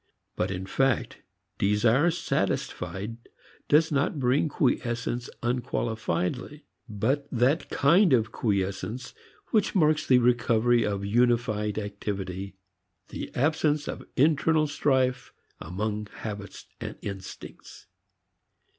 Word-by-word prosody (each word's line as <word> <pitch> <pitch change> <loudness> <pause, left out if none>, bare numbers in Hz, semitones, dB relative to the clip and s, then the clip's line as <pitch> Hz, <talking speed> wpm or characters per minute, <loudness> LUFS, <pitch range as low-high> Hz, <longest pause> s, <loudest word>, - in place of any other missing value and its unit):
But 90 - -1
in 95 0 -4
fact 135 +4 0 0.4
desire 115 - +3
satisfied 100 - -2 0.5
does 155 +2 +4
not 145 +1 0
bring 135 +4 +2
quiescence 120 -3 -1
unqualifiedly, 120 - -2 0.3
but 130 +8 -1
that 130 +6 +1
kind 170 +6 +4
of 115 -4 +3
quiescence 105 +4 -2 0.4
which 215 -2 +2
marks 155 -3 +3
the 130 - +6
recovery 120 -1 +3
of 100 -2 -2
unified 115 -2 +1
activity: 100 -2 -4 0.5
the - - -6
absence 150 +1 +1
of - - -5
internal 155 +2 +3
strife 130 -3 0 0.3
among 105 +5 -3
habits 105 -1 -8
and - - -6
instincts. 95 -2 -9
120 Hz, 100 wpm, -27 LUFS, 105-140 Hz, 0.5 s, the